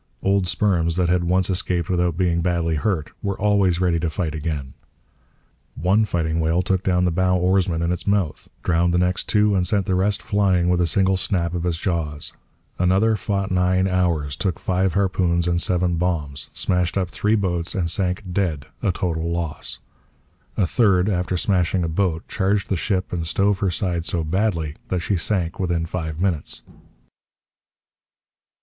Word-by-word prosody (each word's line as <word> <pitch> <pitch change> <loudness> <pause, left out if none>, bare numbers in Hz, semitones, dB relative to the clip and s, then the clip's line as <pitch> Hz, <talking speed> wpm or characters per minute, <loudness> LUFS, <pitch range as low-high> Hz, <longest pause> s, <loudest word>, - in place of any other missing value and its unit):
Old 95 -1 +2
sperms 85 -4 +1
that 90 -1 +1
had 90 -1 +2
once 90 +1 +2
escaped 90 -2 -1
without 90 -2 0
being 85 -2 +1
badly 85 -1 0
hurt 80 0 -1
were 100 -1 -3
always 100 -4 +2
ready 90 -2 +2
to 80 0 -1
fight 80 -1 -2
again. 75 -4 -4 1.0
One 95 +8 +2
fighting 80 -4 -1
whale 80 +3 +1
took 95 0 0
down 90 -1 +1
the 90 - +2
bow 90 +2 +2
oarsman 90 -2 +1
in 85 - 0
its 90 - -4
mouth, 100 -7 0 0.2
drowned 85 +1 +2
the - - +4
next 90 +1 0
two, 105 -1 +3
and 90 -1 +1
sent 100 -4 +1
the 95 - 0
rest 95 +2 +1
flying 95 -4 +2
with 90 0 +2
a 85 - +2
single 95 +3 +2
snap 85 -3 0
of 90 0 -2
its 85 -2 0
jaws. 80 -5 -3 0.5
Another 95 +5 +3
fought 100 -1 -2
nine 90 +1 +2
hours, 85 -6 0
took 95 -1 -2
five 95 -1 0
harpoons 90 -3 +1
and 85 0 +1
seven 90 -1 +1
bombs, 80 -5 -2
smashed 90 0 0
up 90 -2 -1
three 105 +1 +1
boats, 90 -5 -1
and 85 -4 0
sank 90 +1 -1
dead 85 -7 -1 0.2
a 95 - +2
total 85 -3 -2
loss. 85 -3 -3 0.8
A 100 - +3
third, 95 -1 +3
after 90 -1 -1
smashing 90 -1 +1
a - - 0
boat, 80 0 -1
charged 100 0 0
the 95 - +1
ship 95 +1 -1
and 85 -2 -2
stove 100 +4 +1
her 100 -3 +1
side 85 -2 -2
so 85 -2 0
badly 80 -3 -1
that 90 -2 -1
she 100 - 0
sank 85 -1 -1
within 85 -3 0
five 80 -2 -4
minutes. 90 -5 -1
90 Hz, 175 wpm, -22 LUFS, 85-95 Hz, 1.0 s, the